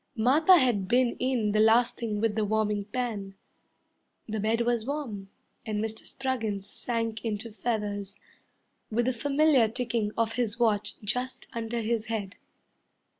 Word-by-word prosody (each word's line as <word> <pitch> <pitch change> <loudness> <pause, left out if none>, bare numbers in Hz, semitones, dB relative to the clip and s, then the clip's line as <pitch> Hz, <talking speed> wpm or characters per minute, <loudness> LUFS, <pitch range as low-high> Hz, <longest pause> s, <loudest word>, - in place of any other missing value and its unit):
Martha 295 +10 +6
had 240 - +2
been 245 +2 +3
in 245 -5 +1
the 215 - +2
last 230 +3 +5
thing 215 -3 -3
with 220 0 +1
the 220 - +1
warming 210 -1 0
pan; 210 -4 -4 0.9
The 220 0 -3
bed 220 +3 +1
was 235 -1 +1
warm, 235 -8 -4 0.3
And 215 -1 -2
Mr. 220 0 -4
Spruggins 225 -7 -2
sank 230 0 -3
into 225 0 -3
feathers, 210 -3 -3 0.7
With 235 +2 +1
the 255 - +1
familiar 280 0 +3
ticking 230 -2 -1
of 225 -1 +1
his 235 -2 -1
watch 210 -3 +1
just 250 +5 -3
under 230 0 -2
his 225 0 -1
head. 215 -3 -4
225 Hz, 145 wpm, -28 LUFS, 210-245 Hz, 0.9 s, Martha